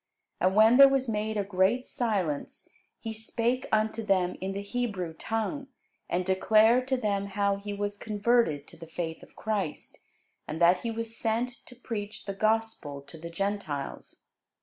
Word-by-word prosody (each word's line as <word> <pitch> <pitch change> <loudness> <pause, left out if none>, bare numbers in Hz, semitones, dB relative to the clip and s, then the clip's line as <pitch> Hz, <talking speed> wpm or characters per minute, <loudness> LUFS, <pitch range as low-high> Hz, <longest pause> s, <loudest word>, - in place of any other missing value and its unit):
And 185 +1 +2
when 220 +3 +7
there 275 0 +10
was 270 -1 +1
made 215 0 -1
a 205 - +1
great 200 +6 +1
silence, 200 - -2 0.3
he 225 -1 -5
spake 230 +3 -1
unto 220 +1 +1
them 185 -4 +1
in 190 +1 -2
the 200 +1 -4
Hebrew 200 -7 -3
tongue, 225 - -3 0.4
and 180 +1 0
declared 220 +6 +4
to 265 -1 +1
them 200 -4 -1
how 200 0 0
he 205 +1 -6
was 205 0 -3
converted 210 -8 +1
to - - -12
the 165 0 -10
faith 165 0 -4
of - - -16
Christ, 205 -8 -3 0.5
and 155 - -4
that 175 +1 +5
he 235 - -3
was 230 0 -3
sent 230 +3 0 0.2
to 250 - -12
preach 215 -4 -6
the 195 - -3
gospel 215 -9 -1
to 150 +4 -11
the 170 +1 -7
Gentiles. 170 -6 -4
210 Hz, 170 wpm, -28 LUFS, 185-225 Hz, 0.5 s, there